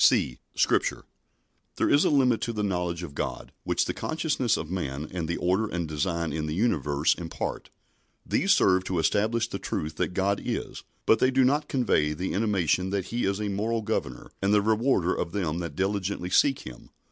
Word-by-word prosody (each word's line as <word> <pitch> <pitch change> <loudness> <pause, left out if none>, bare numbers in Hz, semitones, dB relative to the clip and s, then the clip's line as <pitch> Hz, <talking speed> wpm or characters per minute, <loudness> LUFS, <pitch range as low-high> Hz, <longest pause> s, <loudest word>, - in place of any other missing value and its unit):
(c) - - +3 0.2
(Scripture) - - +1 0.7
There - - +1
is 145 - +4
a - - +3
limit 130 -5 +3
to 115 - -2
the 105 -1 -2
knowledge 90 -3 -1
of 75 -5 -7
God - - -4
which - - +1
the - - -2
consciousness 155 -7 0
of 80 - -5
man 75 -5 -3
and 85 -3 -3
the 85 - -1
order 95 +5 +1
and 85 -4 -3
design 85 +2 -1
in 75 -1 -2
the 75 - -2
universe 75 - +2
impart. 85 -2 -5 0.6
These - - +1
serve 95 0 +4
to 95 - -2
establish 110 +8 +1
the 100 -4 -5
truth 75 0 -4
that 90 - -1
God 100 +1 +1
is, - - -4 0.2
but 110 - +4
they 130 - +4
do 130 0 +3
not 145 +4 +2
convey 75 - +2
the 90 +5 -3
intimation 95 -3 +1
that 95 -2 -1
He 120 - 0
is 100 +1 0
a 105 - -2
moral 110 +3 -1
Governor 105 - -3
and 100 +1 +2
the 105 -1 +4
rewarder 110 -4 +2
of 85 -1 -3
them 85 -5 -1
that 85 -4 -5
diligently 95 -1 -2
seek 135 +7 +3
Him. 60 -1 -11
95 Hz, 195 wpm, -27 LUFS, 85-110 Hz, 0.7 s, is